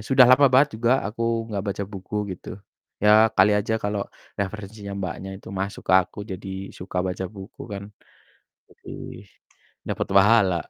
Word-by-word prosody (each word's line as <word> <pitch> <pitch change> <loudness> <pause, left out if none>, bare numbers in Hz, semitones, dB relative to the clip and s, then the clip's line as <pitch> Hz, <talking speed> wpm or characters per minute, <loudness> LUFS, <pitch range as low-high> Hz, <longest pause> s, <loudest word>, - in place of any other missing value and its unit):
sudah 130 +4 +6
lama 130 +3 +7
banget 130 -2 +3
juga 125 +3 +3
aku 110 +3 -5 0.3
gak 100 -2 -2
baca 100 0 -2
buku 95 +3 -8 0.2
gitu, 90 - -11 0.5
ya 105 +1 +7
kali 100 +3 +6
aja 105 +2 +1
kalo 105 -1 -2 0.3
referensinya 100 0 -5
Mbaknya 95 0 -5
itu 95 - -13
masuk 100 +1 -4
ke - - +4
aku 95 - -9
jadi 95 +1 -7 0.3
suka 90 0 -8
baca 95 0 -3
buku 95 +5 -11
kan 100 0 -5 0.9
lebih 95 +1 -10 0.6
dapet - - -2
pahala. 100 -2 +5
100 Hz, 150 wpm, -24 LUFS, 95-110 Hz, 0.9 s, lama